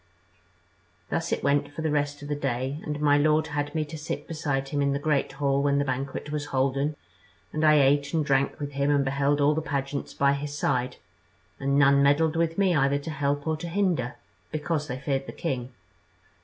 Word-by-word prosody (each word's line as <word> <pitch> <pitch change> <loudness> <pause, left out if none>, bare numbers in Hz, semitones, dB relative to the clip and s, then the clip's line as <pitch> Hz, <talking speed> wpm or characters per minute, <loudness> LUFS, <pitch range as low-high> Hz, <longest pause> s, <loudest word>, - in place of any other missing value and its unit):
"Thus 165 +1 -1
it - - -1
went 145 0 +1
for 160 +2 -6
the 160 - 0
rest 145 0 -1
of - - -7
the 145 - -1
day, 135 +1 -2
and 150 -1 -4
my 145 -1 +4
lord 155 +1 +3
had 145 +1 -3
me 155 -1 0
to 155 +1 -8
sit 155 - -5
beside 145 -4 -2
him 145 -1 -1
in 140 0 +2
the - - 0
great 145 -2 0
hall 140 0 +1
when 140 0 +2
the 140 - +1
banquet 135 +2 -3
was 150 -1 -2
holden, 135 +3 0 0.6
and 155 - -1
I 155 -1 +6
ate 140 0 +3
and 160 -3 0
drank 135 -1 +1
with 145 -1 -4
him 140 0 0
and 140 -1 +3
beheld 140 +2 +1
all 145 +1 +4
the 160 - -1
pageants 140 -1 -3
by 140 0 +3
his 145 +1 -4
side, 125 -3 0 0.6
and 140 0 +1
none 140 -1 +5
meddled 150 +3 +3
with 165 0 0
me 195 -3 +3
either 140 -1 +3
to 145 +3 -6
help 145 -1 -1
or 160 -1 0
to 170 +2 -6
hinder, 170 -10 0 0.4
because 155 0 -2
they 125 - -4
feared 135 0 -2
the - - -7
king. 125 -1 -3
145 Hz, 210 wpm, -26 LUFS, 140-150 Hz, 0.6 s, I